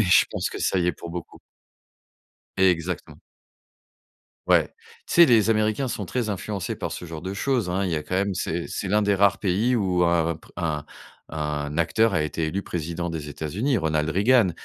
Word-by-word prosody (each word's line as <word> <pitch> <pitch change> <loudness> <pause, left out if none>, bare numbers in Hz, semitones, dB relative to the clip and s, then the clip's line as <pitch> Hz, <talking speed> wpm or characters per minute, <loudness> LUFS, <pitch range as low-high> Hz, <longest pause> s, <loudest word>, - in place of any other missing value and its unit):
mais - - +4
je 90 - +6
pense - - -2
que - - -6
ça 95 - +1
y 90 - +1
est 90 - +2
pour 85 +2 -9
beaucoup. 85 0 -7 1.2
Exactement. 90 -2 0 1.3
Ouais, - - +4 0.4
tu - - -3
sais, 170 0 +8
les 115 -4 +4
Américains 110 +4 +1
sont 100 -5 -4
très 120 0 -2
influencés 100 -1 -3
par - - -4
ce - - -6
genre 80 -2 -7
de 95 +3 -5
choses 125 -4 0
hein. 95 +2 0
Il 90 - -1
y 80 - 0
a 75 - -4
quand 90 - -4
même, 100 +1 +1
c'est 85 -2 -3
c'est 100 - -4
l'un 105 +2 +2
des 100 -1 +2
rares 100 0 +4
pays 105 +6 +1
où 90 -5 +2
un 85 -1 +2
pr - - -20
un 75 -4 -2 0.4
un 75 -1 -3
acteur 95 +6 +2
a - - +2
été 75 +2 -2
élu 95 +5 -2
président 85 +1 -4
des 80 -3 -5
États-Unis, 90 - -1
Ronald 80 -4 0
Reagan. 105 +4 +4
90 Hz, 200 wpm, -24 LUFS, 80-105 Hz, 1.3 s, sais